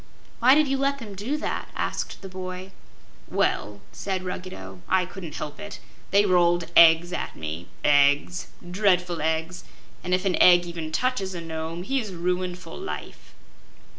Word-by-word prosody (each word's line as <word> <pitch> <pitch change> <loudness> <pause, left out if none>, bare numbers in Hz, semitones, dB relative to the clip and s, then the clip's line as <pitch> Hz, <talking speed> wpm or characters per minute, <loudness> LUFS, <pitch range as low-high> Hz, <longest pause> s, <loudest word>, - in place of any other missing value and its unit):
"Why 255 +3 +7
did 305 -1 +4
you 270 0 0
let 275 +1 +1
them 220 -6 -8
do 220 +10 -2
that?" 305 - -3
asked - - -3
the - - -5
boy. 185 0 -7 0.6
"Well," 105 0 -1
said 190 -2 -3
Ruggedo, 95 - -7
"I 185 -1 +3
couldn't 175 -4 -8
help 150 -1 -6
it. 205 -2 -8 0.3
They 200 +2 +4
rolled 175 -2 +3
eggs 170 +1 +7
at - - -4
me 80 +2 -6 0.2
EGGS 145 +4 +3 0.2
dreadful 180 -4 +2
eggs! 160 +3 -1 0.4
and 180 0 +2
if 185 +2 -3
an 190 - +2
egg 175 -1 +7
even 165 -2 -5
touches 195 -1 -1
a 170 - -4
Nome, 165 +1 -5
he 270 +7 0
is 215 -6 -5
ruined 180 +1 -1
for 180 - -10
life." 385 - -8
180 Hz, 165 wpm, -25 LUFS, 165-195 Hz, 0.6 s, Why